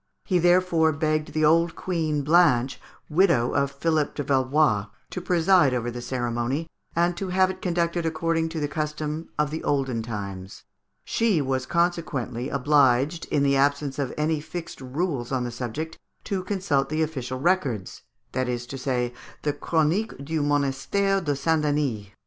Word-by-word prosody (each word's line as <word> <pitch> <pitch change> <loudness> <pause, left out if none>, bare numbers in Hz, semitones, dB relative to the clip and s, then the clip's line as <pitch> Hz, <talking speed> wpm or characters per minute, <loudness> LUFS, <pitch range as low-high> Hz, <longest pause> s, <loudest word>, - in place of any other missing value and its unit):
He 185 -3 +2
therefore 175 -2 +4
begged 155 0 -1
the 155 0 +2
old 165 +2 +3
Queen 160 -5 -1
Blanche, 145 -5 +3 0.3
widow 155 -8 +3
of 140 0 +2
Philippe 150 +1 0
de 145 - -2
Valois, 130 -5 +2 0.2
to 180 - -4
preside 175 -5 +4
over 120 0 -2
the 120 +1 -6
ceremony, 120 +4 -2 0.3
and 175 +1 +2
to 195 - -3
have 185 +1 +3
it 185 - -11
conducted 170 -1 0
according 165 0 0
to 160 0 -4
the 145 - 0
custom 150 +1 -3
of 150 0 0
olden 135 -5 0
times. 100 -4 -6 0.4
She 220 -7 +2
was 130 -2 -1
consequently 160 -8 -1
obliged, 140 +2 +3
in 140 - +1
the 140 0 +3
absence 140 0 +1
of 135 -3 -1
any 155 0 +1
fixed 165 0 -7
rules 135 -1 -2
on 130 -2 0
the 120 - -3
subject, 125 +7 -5 0.2
to 190 -2 -2
consult 180 -9 0
the 155 +1 +1
official 130 -5 -4
records, 135 - 0 0.3
that 130 -1 -1
is 120 -1 -2
to 135 +2 -7
say, 125 -2 -1 0.3
the 145 - +1
"Chronique 165 +9 0
du 160 +1 -1
Monastère 145 +8 +1
de 145 -3 0
Saint 160 +3 +1
Denis." 145 -9 0
150 Hz, 160 wpm, -25 LUFS, 130-165 Hz, 0.4 s, therefore